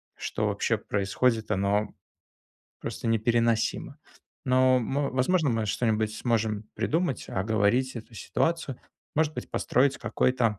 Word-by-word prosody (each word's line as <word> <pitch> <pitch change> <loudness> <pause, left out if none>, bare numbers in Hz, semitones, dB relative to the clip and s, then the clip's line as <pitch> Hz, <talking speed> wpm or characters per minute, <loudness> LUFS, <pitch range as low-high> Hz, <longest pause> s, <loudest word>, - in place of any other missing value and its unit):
что - - -2
вообще - - 0
происходит, 110 +3 0
оно 100 +2 +1 0.9
просто - - -5
непереносимо. 115 0 +1 0.5
Но 130 0 +4
мы 135 +4 -1
возможно, 140 +4 +2
мы 115 -2 0
что-нибудь 110 0 0
сможем 110 -3 0
придумать. 165 -3 0
Оговорить 110 +6 +1
эту 115 +1 -9
ситуацию, 160 - -1 0.4
может 155 0 +2
быть, - - -6
построить 135 +2 +2
какой-то 120 -5 +1
115 Hz, 115 wpm, -27 LUFS, 110-130 Hz, 0.9 s, Но